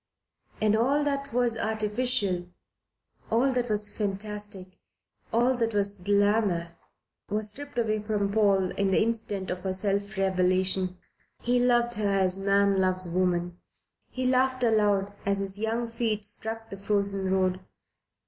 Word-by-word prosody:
And 215 0 +3
all 270 +6 +2
that 280 -1 -2
was 240 -1 +2
artificial, 215 -4 0 0.8
all 245 +4 +3
that 245 -1 -1
was 210 -1 -1
fantastic, 205 -2 -4 0.5
all 245 +3 +3
that 230 -2 -1
was 200 -1 0
glamour, 200 -2 +1 0.6
was 210 +1 +1
stripped 285 +4 -10
away 215 -2 +1
from 210 -1 -1
Paul 200 -4 +3
in 200 -1 0
the 190 - +3
instant 215 -4 -2
of 180 - -3
her 185 0 -3
self 200 +1 -2
revelation. 185 -1 +1 0.5
He 245 +1 +2
loved 240 -2 +2
her 205 -1 +1
as 190 -1 +1
man 200 0 +3
loves 185 -1 0
woman. 175 0 -1 0.5
He 255 0 -4
laughed 255 0 +2
aloud 205 -3 +2
as 200 0 0
his 195 0 -5
young 225 +2 -1
feet 225 -2 0
struck 225 +2 -1
the 195 - -6
frozen 200 -1 -1
road. 185 -1 +1
205 Hz, 140 wpm, -27 LUFS, 190-230 Hz, 0.8 s, And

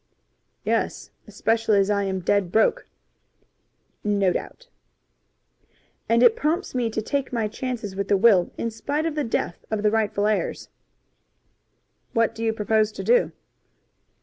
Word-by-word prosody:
"Yes, - - -1 0.2
especially 225 -2 +1
as 200 +1 +2
I 200 -1 +1
am 190 -1 -2
dead 190 0 +1
broke." 225 - +2 1.2
"No 200 -3 +2
doubt." - - -6 1.4
"And 230 +1 +4
it 445 - +6
prompts 345 -2 -1
me 245 -3 0
to 220 0 -3
take 280 +3 -2
my 230 -3 0
chances 220 -3 -5
with 200 0 -2
the 200 - +3
will 195 -4 +4
in 230 - -2
spite 285 +8 -2
of 325 - -1
the 300 -1 -1
death 225 -7 -3
of 215 -1 -2
the 210 - +3
rightful 215 -2 0
heirs." 215 0 -1 1.4
"What 230 0 +2
do 225 - -6
you 225 - +2
propose 215 0 +1
to - - -6
do?" 485 0 +3
220 Hz, 150 wpm, -24 LUFS, 205-250 Hz, 1.4 s, it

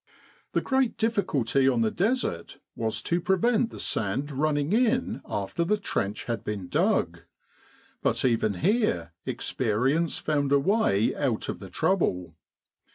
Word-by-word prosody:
The - - +2
great 265 -3 +1
difficulty 145 - +1
on 120 -3 +1
the 110 -1 +2
Desert 200 - -1 0.2
was 110 -1 -2
to 175 +1 0
prevent 225 +6 +2
the - - -10
sand 115 +8 -1
running 145 +3 0
in 245 +2 +1
after 105 - -2
the 210 +5 +1
trench 100 - -2
had 115 -2 -3
been 100 -4 -4
dug. - - +1 0.8
But - - +1
even 115 -4 +2
here 160 - 0
experience 130 +8 0
found 145 -3 0
a 140 - +6
way 155 - +2
out 130 -7 -1
of - - -4
the 95 - -9
trouble. 90 - 0
140 Hz, 140 wpm, -27 LUFS, -, 0.8 s, a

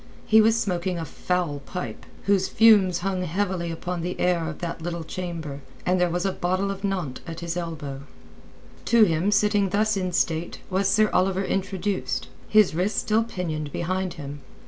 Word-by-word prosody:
He 220 0 +6
was 225 +1 +4
smoking 180 -3 -1
a 165 - -3
foul 170 -1 -2
pipe, 180 +6 -6 0.2
whose 195 -1 +2
fumes 205 -6 +5
hung 190 -2 0
heavily 180 0 -1
upon 175 +1 -4
the 180 +2 -4
air 175 -2 +1
of 165 - -6
that 170 -1 -5
little 170 0 -3
chamber, 160 -5 -5 0.2
and 180 0 +2
there 180 - +3
was 175 +2 -1
a 195 - +2
bottle 185 +2 -1
of 195 0 -7
Nantes 180 -10 -2
at 165 0 -6
his 170 0 -3
elbow. 155 -6 -5 0.8
To 235 -1 +6
him, 175 +1 +2
sitting 205 -1 +3
thus 215 +2 +2
in 185 -2 -1
state, 170 -1 0
was 190 +1 +2
Sir 215 +2 +3
Oliver 190 +1 +2
introduced—his 195 +1 0
wrists 180 +6 0
still 220 +1 +2
pinioned 160 -9 -4
behind 185 +2 -2
him. 145 -1 -7
180 Hz, 170 wpm, -25 LUFS, 170-195 Hz, 0.8 s, He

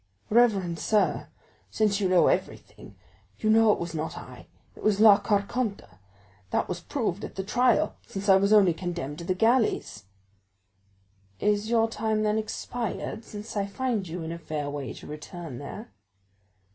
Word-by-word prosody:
"Reverend 200 -8 +3
sir, 210 +4 +1 0.4
since 210 -2 +1
you 190 -3 +1
know 180 -2 +5
everything, 100 - -2 0.4
you 215 - +1
know 225 0 +6
it - - +1
was 170 -1 -5
not 160 0 -4
I—it - - -14
was 210 -2 +2
La 210 -2 +8
Carconte; 205 +1 -1 0.6
that - - 0
was 180 -1 -4
proved 205 -1 -3
at - - -7
the 190 - -3
trial, 245 +3 +2
since 195 +1 -6
I 190 -1 +7
was 200 +1 +2
only 200 -5 +6
condemned 170 -4 -5
to - - -6
the 185 - 0
galleys." 225 - +1 1.3
"Is 210 +1 +1
your 225 -1 +3
time, 220 -1 -1
then, 215 0 +1
expired, 220 0 -4
since 210 0 -9
I 200 -1 0
find 225 -2 -2
you 165 +1 -5
in 160 - -5
a 170 - -6
fair 150 -3 -4
way 140 -5 -5
to - - -12
return 155 -2 -8
there?" 205 +11 -8
200 Hz, 160 wpm, -27 LUFS, 170-220 Hz, 1.3 s, La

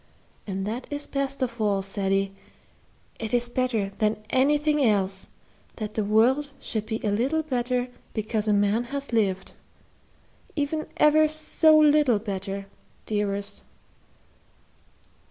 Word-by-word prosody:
And 195 -1 -3
that 230 +5 -4
is 290 0 -2
best 275 -1 -2
of 235 -2 -3
all, 200 -2 +1
Ceddie, 195 0 -1 0.9
it 225 +1 -1
is 240 0 +2
better 240 -5 0
than 215 -1 +2
everything 295 +2 +3
else, 195 -4 +1 0.5
that 215 -1 -5
the 215 - 0
world 240 +8 +3
should 215 -1 -1
be 220 0 -2
a 210 - +1
little 265 +10 +1
better 250 -3 -1 0.3
because 215 0 -1
a - - +3
man 205 +3 +2
has 280 0 -4
lived 195 -4 0 1.0
even 310 +1 -2
ever 310 +1 +5
so 310 0 +3
little 295 -6 +5
better, 195 -1 -4 0.4
dearest." 205 -1 -2
230 Hz, 125 wpm, -25 LUFS, 205-280 Hz, 1.0 s, ever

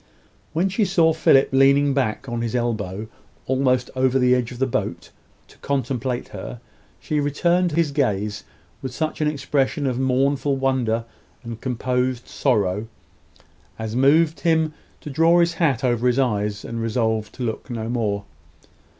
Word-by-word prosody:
When 170 +4 +1
she 200 +3 0
saw 170 -4 +3
Philip 135 -3 +4
leaning 140 +1 +4
back 135 -1 -1
on 120 -1 -3
his 115 0 -2
elbow, 110 -4 -2 0.4
almost 130 -1 +1
over 130 0 +2
the 125 -1 +4
edge 125 -1 0
of 125 - -8
the 135 - +1
boat, 130 - -3 0.4
to - - -20
contemplate 130 -2 -2
her, - - -7 0.4
she 150 - -2
returned 170 +4 +1
his 165 -2 +1
gaze 105 -7 -1 0.4
with 130 -1 -6
such 155 0 -2
an 155 - +2
expression 145 -1 0
of 130 -2 -1
mournful 135 +1 +1
wonder 125 -4 0 0.4
and 115 -1 -7
composed 125 0 -1
sorrow, 105 -5 0 0.9
as 110 0 -4
moved 150 +5 +4
him 160 -2 +1 0.3
to 150 - -7
draw 165 +4 +4
his 170 0 +3
hat 145 -7 +1
over 120 -1 +1
his 125 0 +2
eyes, 105 -6 0
and 115 0 -4
resolve 110 -1 -1
to 130 - -6
look 115 +2 -4
no 115 -2 -4
more. 110 -4 -1
130 Hz, 155 wpm, -22 LUFS, 115-145 Hz, 0.9 s, Philip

